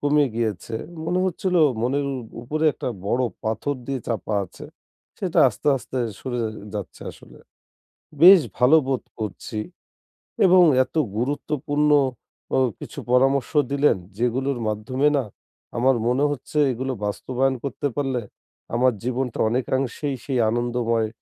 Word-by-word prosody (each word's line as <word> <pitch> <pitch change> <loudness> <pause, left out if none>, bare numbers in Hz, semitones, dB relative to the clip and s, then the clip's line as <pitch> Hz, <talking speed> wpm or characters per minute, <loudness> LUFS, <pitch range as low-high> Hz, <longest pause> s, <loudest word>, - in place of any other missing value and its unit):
কমে 145 0 +3
গিয়েছে। 110 -1 -2 0.3
মনে 180 +2 0
হচ্ছিল 185 0 -1 0.3
মনের 140 +4 0
উ - - -3 0.3
উপরে 155 +6 -2
একটা - - -4 0.2
বড়ো 125 +4 +1 0.2
পাথর 110 +6 -1
দিয়ে 135 -2 -2
চাপা 110 -2 -2
আছে। 90 - -12 0.5
সেটা - - -1
আস্তে, - - -3
আস্তে, 130 0 -5 0.2
সরে 125 -2 -4 0.4
যাচ্ছে 100 -3 -6
আসলে - - -16 0.8
বেশ 185 +1 +10 0.2
ভালো 125 +6 +6
বোধ 130 -2 0 0.2
করছি। 110 +2 -5 0.9
এবং 180 0 +7 0.2
এত - - -17 0.2
গুরুত্বপূর্ণ 145 +3 0 0.7
অ - - +3 0.2
কিছু - - -9
পরামর্শ 135 +1 +3 0.2
দিলেন 140 -5 +3 0.2
যেগুলোর 125 +2 0
মাধ্যমে 130 +7 0
না 130 - -1 0.5
আমার 125 +1 +3
মনে 130 +4 +2
হচ্ছে 145 +2 -4
এগুলো 130 +3 -3
বাস্তবায়ন 130 +5 0
করতে 140 +1 -3
পারলে 135 -4 -1 0.5
আমার 125 +1 +3
জীবনটা 125 0 -2
অনেকাংশেই 130 +3 -1
সেই 135 -3 -1
আনন্দময় 115 -1 0
130 Hz, 125 wpm, -23 LUFS, 120-145 Hz, 0.9 s, বেশ